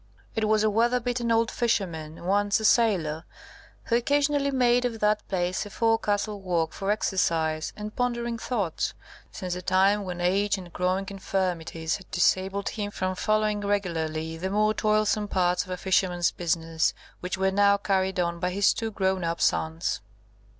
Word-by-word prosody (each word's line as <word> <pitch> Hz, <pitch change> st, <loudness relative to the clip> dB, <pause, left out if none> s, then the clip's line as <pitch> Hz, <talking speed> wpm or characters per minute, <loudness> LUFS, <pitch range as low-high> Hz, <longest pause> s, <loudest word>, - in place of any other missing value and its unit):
It 220 Hz, -1 st, +1 dB
was 215 Hz, 0 st, +3 dB
a 215 Hz, -, +3 dB
weather 235 Hz, +4 st, +2 dB
beaten 240 Hz, -1 st, -1 dB
old 230 Hz, 0 st, +2 dB
fisherman, 170 Hz, -9 st, -2 dB
once 205 Hz, +2 st, +2 dB
a 220 Hz, -, -3 dB
sailor, 180 Hz, -10 st, +2 dB, 0.6 s
who 230 Hz, -, 0 dB
occasionally 285 Hz, +3 st, +2 dB
made 245 Hz, -2 st, +3 dB
of 235 Hz, -3 st, -2 dB
that 210 Hz, 0 st, +2 dB
place 180 Hz, -1 st, -1 dB
a 205 Hz, -, -9 dB
forecastle 210 Hz, -2 st, 0 dB
walk 170 Hz, -4 st, -1 dB
for 195 Hz, 0 st, -4 dB
exercise 165 Hz, -6 st, 0 dB
and 210 Hz, 0 st, -6 dB
pondering 235 Hz, -1 st, -1 dB
thoughts, 205 Hz, -11 st, -2 dB, 0.4 s
since 185 Hz, -3 st, -4 dB
the 180 Hz, -, -4 dB
time 195 Hz, +3 st, +3 dB
when 180 Hz, -2 st, -5 dB
age 195 Hz, +3 st, +1 dB
and 180 Hz, -3 st, -10 dB
growing 185 Hz, +2 st, 0 dB
infirmities 175 Hz, -4 st, -2 dB
had 190 Hz, -, -16 dB
disabled 195 Hz, +1 st, +1 dB
him 205 Hz, -2 st, -4 dB
from 185 Hz, -2 st, -2 dB
following 215 Hz, +1 st, 0 dB
regularly 165 Hz, -5 st, -2 dB
the 185 Hz, +3 st, -3 dB
more 215 Hz, +2 st, +2 dB
toilsome 215 Hz, -1 st, +1 dB
parts 180 Hz, -2 st, +1 dB
of -, -, -16 dB
a 180 Hz, -, -3 dB
fisherman's 180 Hz, -2 st, +1 dB
business, 165 Hz, -2 st, 0 dB, 0.2 s
which 180 Hz, +1 st, -4 dB
were 190 Hz, 0 st, +1 dB
now 200 Hz, +1 st, +4 dB
carried 190 Hz, -2 st, 0 dB
on 170 Hz, -1 st, -1 dB
by 180 Hz, +1 st, 0 dB
his 200 Hz, +2 st, +3 dB
two 225 Hz, -, -3 dB
grown 190 Hz, -3 st, 0 dB
up 170 Hz, 0 st, -2 dB
sons. 160 Hz, -, 0 dB
195 Hz, 165 wpm, -26 LUFS, 180-215 Hz, 0.6 s, now